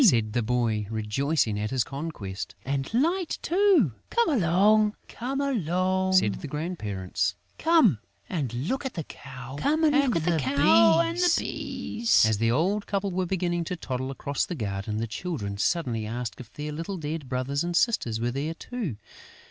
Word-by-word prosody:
said 115 - +4
the 120 - +1
boy, 110 -3 0
rejoicing 110 +1 0
at 105 +1 -2
his 130 -2 +1
conquest. 135 -9 -6
"And 135 0 -2
Light 330 +9 +1
too!" 360 - +4 0.2
"Come 470 0 +2
along," 210 - +4 1.2
said 145 - +3
the - - -5
grandparents. 100 - -2 0.2
"Come 315 - +4 0.3
and 145 -10 -2
look 150 - -2
at 265 - -5
the 165 - -3
cow 130 -1 -9
and 310 +3 +2 1.4
the 355 -1 +4
bees." 230 - +1
As 110 -2 +1
the 115 0 +2
old 185 - +1
couple 200 -1 -1
were 185 0 -1
beginning 175 -2 0
to 180 - -3
toddle 130 -5 -4
across 140 +1 -2
the 175 - -4
garden, 105 -3 -3
the 115 - -1
children 110 - -4
suddenly 115 -6 0
asked 120 +1 -4
if 125 -4 -10
their 150 0 -5
little 165 +6 -4
dead 150 -3 -5
brothers 135 +3 -1
and 175 0 -2
sisters 145 - +1
were 120 +1 0
there 145 +5 -3
too. 215 - -4
145 Hz, 150 wpm, -27 LUFS, 115-185 Hz, 1.4 s, said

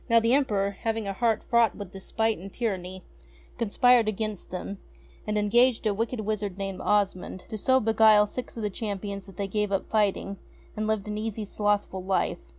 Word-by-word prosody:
Now 230 0 +6
the 230 +2 +2
Emperor, 200 -8 +1
having 225 -2 -1
a 195 - -2
heart 225 +1 +1
fraught 235 -2 +3
with 200 -3 -8
despite 220 +2 -1
and 195 +3 -9
tyranny, 185 -5 -3 0.6
conspired 235 +1 +4
against 215 -1 -4
them, 190 +2 -5 0.5
and 210 0 0
en 210 0 +1
gaged 240 +1 +4
a 210 - +2
wicked 225 +3 -2
wizard 210 -3 -2
named 195 -1 -4
Osmond 195 -3 0
to - - -5
so 260 +5 +3
beguile 220 -2 +5
six 245 +3 -6
of 225 - -4
the 210 - -1
Champions 200 -2 -5
that 190 -3 -14
they 200 - -2
gave 210 +1 -1
up 195 - -2
fighting, 200 -2 +1 0.4
and 215 0 -2
lived 215 -2 -1
an 210 0 -3
easy 220 -1 -3
slothful 205 -2 -1
life. 190 - -1
210 Hz, 190 wpm, -27 LUFS, 195-225 Hz, 0.6 s, Now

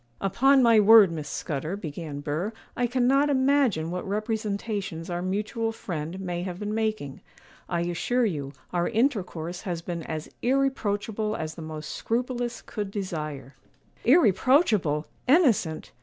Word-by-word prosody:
'Upon 265 +7 +4
my 230 -2 +6
word, 210 -3 +8
Miss 155 -2 -5
Scudder,' 155 +5 -3
began 150 -4 -6
Burr, 160 +9 -2 0.2
'I 245 - +1
cannot 260 +4 +3
imagine 260 - +2
what 180 +1 -4
representations 205 -4 -3
our 175 0 -2
mutual 210 +4 -1
friend 170 -4 -5
may 175 -2 -3
have 180 -1 -4
been 210 +2 -4
making. 215 -11 -2 0.5
I 170 -1 0
assure 175 +9 0
you, 145 -9 -3 0.2
our 175 -1 +1
intercourse 180 - -1
has 175 -5 -4
been 170 -1 -4
as 155 -1 -5
irreproachable 220 -5 0
as 155 0 -4
the 165 - -10
most 155 -1 -6
scrupulous 245 0 -2
could 205 -2 -4
desire.' 155 - -5 0.5
'Irreproachable! 220 - +4 0.2
innocent! 250 - +3
200 Hz, 135 wpm, -26 LUFS, 165-235 Hz, 0.5 s, word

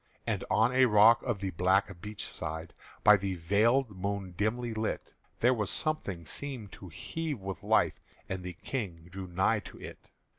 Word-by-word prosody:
And - - -1
on 125 - +3
a 130 0 +6
rock 110 +1 +7
of 115 -6 -2
the 95 -1 -2
black 95 +1 +1
beach 105 +1 -5
side 80 +1 -5 0.3
By 105 0 +8
the 95 -1 -2
veiled 105 +7 +2
moon 100 -1 -3
dimly 115 +4 -1
lit, 110 0 -3 0.3
There 125 +2 +5
was 105 -5 -1
something 100 - -1
seemed 125 - -5
to 95 - -10
heave 155 - -4
with 95 -2 -6
life - - +2 0.3
As 95 - -3
the 90 0 -6
King 90 -5 -5
drew 95 0 -6
nigh 95 +5 +2
to 100 - -11
it. - - -11
100 Hz, 175 wpm, -30 LUFS, 95-115 Hz, 0.3 s, By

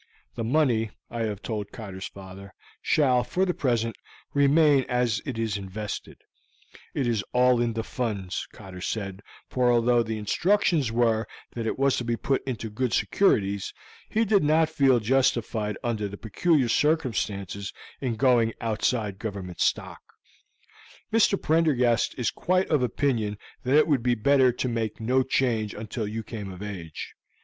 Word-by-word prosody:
The 115 - -4
money, 120 -4 +2 0.2
I 115 -1 -2
have 105 -2 -4
told 105 -3 -4
Cotter's 95 -5 -7
father, 95 0 -11 0.3
shall, 130 -5 +3
for 180 +10 0
the 180 - 0
present, 115 -6 0 0.4
remain 145 0 +5
as 125 -3 +1
it 130 -4 -3
is 110 -2 -1
invested; 100 +2 -6 0.8
it 135 - 0
is 115 -4 0
all 125 -1 +4
in 120 -1 0
the 115 0 -2
Funds, 105 -8 -3
Cotter 90 -1 -11
said, 100 -1 -4 0.3
for 125 -1 +2
although 120 0 +4
the 110 -1 -3
instructions 155 - +1
were 115 -1 +2 0.3
that 115 -1 -3
it - - -2
was 135 0 +2
to - - -2
be 120 0 0
put 135 +3 0
into 115 -4 -4
good 125 +3 -1
securities, 100 - +1 0.3
he 225 +1 +1
did 200 -4 +3
not 155 +1 +3
feel 135 -5 +4
justified 115 -3 +1
under 110 -4 -1
the 100 +1 -8
peculiar 135 - +1
circumstances 110 - 0 0.3
in 125 -4 -2
going 120 -2 +3
outside 110 -2 -1
Government 100 -5 -6
stock. - - 0 1.1
Mr. 215 -3 +4
Prendergast 145 -7 +2
is 125 - 0
quite 185 +1 +1
of 150 -4 +3
opinion 120 -5 0 0.2
that 130 +3 +3
it 155 - +5
would 140 -6 +2
be 120 0 +2
better 130 +2 +4
to 125 +1 -3
make 115 -3 -2
no 125 +4 +2
change 120 -5 0
until 110 0 -4
you 110 +2 -4
come 105 -3 -7
of 95 +2 -8
age. 90 -7 -7
115 Hz, 155 wpm, -26 LUFS, 105-135 Hz, 1.1 s, remain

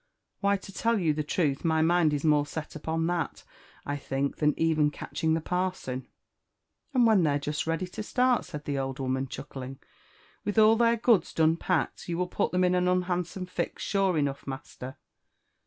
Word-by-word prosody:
" - - -55
Why, 200 0 +3
to 195 +1 -12
tell 230 +3 +1
you 165 -6 +2
the 150 - -1
truth, 150 -2 0
my 160 -2 +2
mind 170 -1 +3
is 145 -1 -1
more' 150 -2 +3
set 160 0 -6
upon 160 +1 -2
Chat, 175 0 -2 0.4
I 145 +1 -2
think, 135 0 -2
than 150 -1 +2
even 155 -2 +3
catching 155 +2 -2
the 165 - -1
parson." 180 -8 -2 0.8
"And 250 -3 +4
when 220 -4 +5
they're 145 -3 +2
jest 150 +2 -3
ready 165 +3 0
to 180 - -7
start," 250 +2 +2
said 150 0 -8
the 140 -1 -1
old 135 0 -3
woman, 130 0 -1
chuckling, 135 0 -7 0.7
"trilh 205 +2 -3
all 220 +1 +7
their 235 0 +3
goods 225 -3 +2
done 160 0 +4
packed, 175 0 -1
you 170 - -1
will 180 - +1
put 180 - -1
them 180 0 +2
in 180 0 +3
an 180 0 +2
unhandsome 180 0 -1
fix, 180 - -4
sure 195 -4 +1
enough, 140 -2 -1
master." 135 -1 -7
165 Hz, 190 wpm, -28 LUFS, 145-185 Hz, 0.8 s, all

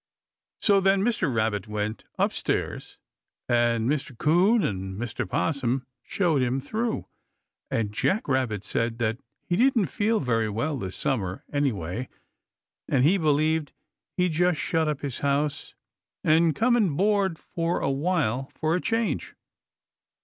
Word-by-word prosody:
So 200 -2 +5
then 195 0 +3
Mr. 225 - +1
Rabbit 110 -3 0
went 105 +1 -3
up - - +1
stairs - - -3 0.5
and 120 -1 +2
Mr. 140 -2 -2
'Coon 185 - +4
and 95 0 -3
Mr. 120 0 -4
'Possum 135 -4 0 0.2
showed 165 - +1
him 130 +1 +1
through, 220 - -2 0.6
and 110 -3 -1
Jack 195 - 0
Rabbit 130 -7 0
said 115 +2 -1
that 115 0 -1 0.2
he 175 - -1
didn't 240 -1 +3
feel 215 +2 +1
very 115 -4 0
well 115 +9 -1
this 95 -3 -5
summer, 100 -8 -2
any 145 -2 +2
way, 100 +5 -5 0.8
and 125 - +3
he 185 +7 +4
believed 155 0 +1 0.4
he'd 180 -1 +2
just 175 0 +2
shut 160 -1 0
up 150 -3 -2
his 140 -4 -4
house 140 +1 -1 0.5
and 160 0 +4
come 240 - +3
and 190 -11 +2
board 195 -3 +2 0.2
a 165 -4 0
while 135 -4 0
for 160 +1 0
a 180 - -1
change. 225 0 -1
145 Hz, 140 wpm, -26 LUFS, 115-180 Hz, 0.8 s, So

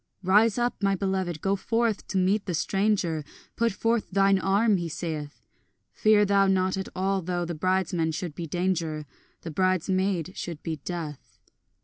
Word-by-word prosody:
Rise 210 +4 +4
up, 240 -1 -1
my 195 -1 +2
beloved, 190 -4 -2
go 195 +1 +1
forth 225 +1 -1
to 195 - -2
meet 195 +3 +1
the 180 - -1
stranger, 195 -3 0 0.3
Put 230 0 +1
forth 225 +2 0
thine 195 0 +3
arm, 200 +2 +3
he 170 -1 -3
saith; 150 -7 -5 0.5
Fear 215 -1 +4
thou 200 -1 +3
not 190 -1 +2
at 190 0 -4
all 195 +1 0
though 175 0 -2
the 170 - -4
bridesman 175 -1 0
should 165 0 -4
be 165 +2 -6
Danger, 165 -3 -1 0.4
The 165 - -6
bridesmaid 185 0 0
should 170 -3 -6
be 160 -1 -3
Death. 150 - -7
185 Hz, 160 wpm, -27 LUFS, 165-195 Hz, 0.5 s, Rise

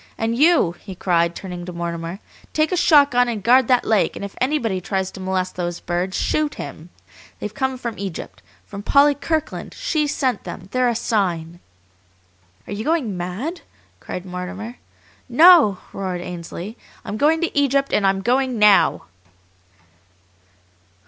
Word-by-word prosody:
And 225 +1 -1
YOU," 300 - +4
he 190 -3 -9
cried, 170 -2 +1
turning 180 -2 -7
to 180 - -6
Mortimer, 170 0 -4 0.4
"take 310 0 +1
a - - +1
shotgun 285 -8 +5
and 220 -5 -3
guard 250 +2 +5
that 250 -1 +3
lake, 215 -3 +2
and - - -5
if 200 - -8
anybody 235 -9 0
tries 190 -1 -2
to - - -11
molest 185 -1 -2
those 175 -1 -3
birds 175 +1 -2
shoot 305 -1 0
him! 160 +3 -8 0.5
They've 210 - -5
come 265 +2 -1
from 235 -3 -6
Egypt! 195 -4 -6 0.2
From 200 0 -8
Polly 280 +7 +4
Kirkland! 315 +2 -3
She 305 -2 0
sent 265 -3 -1
them! 185 0 -8
They're 255 -1 +2
a 235 - -1
sign!" 175 -7 -1 1.1
"Are - - -6
you 210 +2 -4
going 285 - 0
mad?" 200 - -4 0.4
cried 180 - -7
Mortimer. 190 +6 -6 0.5
"No!" 310 - +7 0.2
roared 185 -2 -3
Ainsley. 175 +5 -7 0.3
"I'm 205 - -4
going 310 +6 +3
to 340 - -2
Egypt, 275 -1 +2
and 200 - +3
I'm 195 0 0
going 255 +1 +1
NOW!" 210 -2 +4
210 Hz, 155 wpm, -21 LUFS, 185-270 Hz, 1.1 s, No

